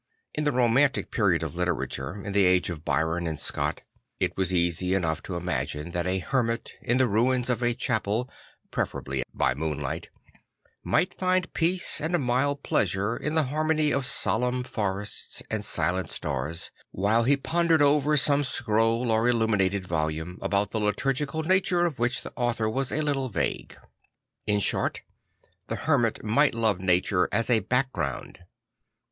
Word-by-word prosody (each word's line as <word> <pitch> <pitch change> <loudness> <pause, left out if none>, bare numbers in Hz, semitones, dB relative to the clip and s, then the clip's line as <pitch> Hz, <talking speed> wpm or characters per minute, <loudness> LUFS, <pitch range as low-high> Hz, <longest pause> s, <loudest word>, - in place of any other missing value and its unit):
In 150 - -2
the 145 - +3
romantic 130 +2 +2
period 95 -7 +2
of 80 -1 -5
Ii 90 - +2
tera 90 -2 -1
ture, 75 +10 -6
in 100 - -3
the 100 0 +4
age 90 0 +3
of 80 -3 -7
Byron 85 +2 0
and 80 -2 -4
Scott, - - 0 0.4
it - - 0
was 95 -1 -1
easy 90 +1 +1
enough 80 -4 -1
to 90 - -6
imagine 75 -2 -3
that 85 +1 -2
a 95 +1 +1
hermit 115 +3 -1
in 120 - +1
the 130 -1 +3
ruins 125 +4 +1
of 120 -1 -1
a 120 -1 +1
chapel 110 +1 -1 0.4
(preferably 65 -1 -2
by - - +1
moonlight) 75 0 -4 0.7
might 180 - +1
find 185 -1 0
peace 175 -1 +2
and 160 +4 0
a - - +4
mild 140 +2 0
pleasure 100 +4 +1
in 150 +5 -3
the 160 - +4
harmony 155 -1 +2
of 135 -1 0
solemn 125 -1 +1
forests 105 -4 -4
and 110 -2 -1
silent 90 -2 -1
stars, 80 +2 -4 0.2
while 105 +4 +1
he 135 +4 +3
pondered 165 +1 +2
over 150 +1 +3
some 145 +1 +4
scroll 115 -1 +1
or 110 +2 +3
illuminated 100 -5 +1
volume, 80 +1 -3
about 100 0 0
the 110 - -1
liturgical 135 +8 -1
nature 180 0 +2
of 155 -8 -3
which 120 +2 0
the - - -8
author 120 -3 0
was 130 +4 -1
a 155 - 0
little 135 -3 -1
vague. 100 - -3 0.7
In 105 -1 +2
short, - - 0 0.7
the - - -2
hermit 125 -8 +1
might 115 +6 +3
love 110 -5 +1
nature 90 0 +2
as 115 +2 0
a 115 - +5
background. 120 - -2
115 Hz, 165 wpm, -26 LUFS, 90-135 Hz, 0.7 s, a